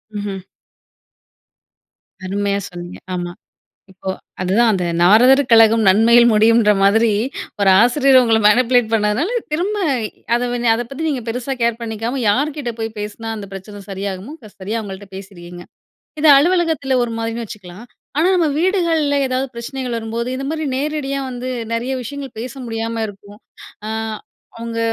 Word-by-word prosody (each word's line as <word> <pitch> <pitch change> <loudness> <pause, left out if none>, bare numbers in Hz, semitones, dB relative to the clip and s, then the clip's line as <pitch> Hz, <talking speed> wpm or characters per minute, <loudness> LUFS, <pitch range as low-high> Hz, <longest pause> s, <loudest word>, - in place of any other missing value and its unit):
ம்ஹ்ம். 200 -2 -5 1.8
அருமையா 200 +1 -1
சொன்னீங்க 175 0 -8 0.2
ஆமா. 175 -1 -4 0.6
இப்போ 190 0 -9 0.3
அதுதான் 210 +6 +3
அந்த 180 -2 -1 0.2
நாரதர் 235 +10 +6
கலகம் 225 -1 +6
நன்மையில் 235 +4 +6
முடியும்ன்ற 220 0 +4
மாதிரி. 220 +3 +4 0.5
ஒரு 195 -1 +4
ஆசிரியர் 260 +3 +5
உங்கள 225 -2 +3
மேனிபுலேட் 240 +1 +3
பண்ணதுனால 220 - +1 0.2
திரும்ப 365 +7 -1 0.6
அத 240 - +1 0.3
அத 235 - -2
பத்தி 275 +3 -6
நீங்க 265 -5 -2
பெருசா 250 +3 -3
கேர் 235 0 0
பண்ணிக்காம, 230 +3 -3
யார்கிட்ட 280 +1 -1
போய் 225 0 -2
பேசுனா 210 +2 -6
அந்த 200 -1 -7
பிரச்சன 200 +1 -9
சரியாகுமோ 195 +5 -5
க 215 - -13
சரியா 210 +4 -3
அவங்கள்ட்ட 200 -1 -8
பேசிருக்கீங்க. 175 -2 -10 0.6
இது 315 - +3
அலுவலகத்துல 320 -5 +1
ஒரு 235 - -3
மாரின்னு 230 +1 -3
வச்சுக்கலாம். 200 +1 -11 0.3
ஆனா 320 +4 +3
நம்ம 335 -3 +2
வீடுகள்ல 335 -6 +1
எதாவது 255 +1 -1
பிரச்சனைகள் 245 +1 -5
வரும்போது 230 +2 -4
இந்த 270 +1 -4
மாதிரி 315 -1 -3
நேரடியா 280 -1 -2
வந்து 250 0 -6 0.3
நெறைய 240 +3 -2
விஷயங்கள் 270 -1 -8
பேச 245 +1 -6
முடியாம 225 0 -3
இருக்கும். 205 +1 -13 0.5
அ - - -4 0.7
அவங்க 230 0 -5
230 Hz, 135 wpm, -18 LUFS, 205-265 Hz, 1.8 s, நாரதர்